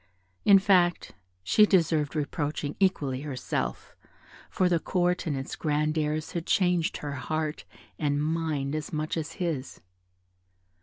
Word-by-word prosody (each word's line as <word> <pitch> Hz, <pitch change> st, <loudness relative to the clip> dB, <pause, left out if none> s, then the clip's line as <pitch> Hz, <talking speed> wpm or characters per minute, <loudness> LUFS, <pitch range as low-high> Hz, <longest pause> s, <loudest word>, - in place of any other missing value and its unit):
In 200 Hz, -1 st, +8 dB
fact, 185 Hz, -3 st, +2 dB, 0.3 s
she 210 Hz, -, +5 dB
deserved 160 Hz, -6 st, +2 dB
reproaching 150 Hz, -1 st, -2 dB
equally 145 Hz, -9 st, +1 dB
herself, 125 Hz, -, -4 dB, 0.5 s
for 185 Hz, -, +1 dB
the 175 Hz, -2 st, +2 dB
Court 180 Hz, +1 st, 0 dB
and 145 Hz, -3 st, -1 dB
its 135 Hz, -, -5 dB
grand 150 Hz, 0 st, 0 dB
airs 155 Hz, 0 st, -1 dB
had 170 Hz, -1 st, -4 dB
changed 180 Hz, -3 st, +2 dB
her 145 Hz, -, -5 dB
heart 155 Hz, +2 st, -3 dB, 0.3 s
and 145 Hz, -2 st, +1 dB
mind 155 Hz, -3 st, -1 dB
as 155 Hz, -1 st, -4 dB
much 155 Hz, 0 st, -2 dB
as 160 Hz, -2 st, -4 dB
his. 160 Hz, -7 st, -3 dB
155 Hz, 135 wpm, -27 LUFS, 145-175 Hz, 0.5 s, In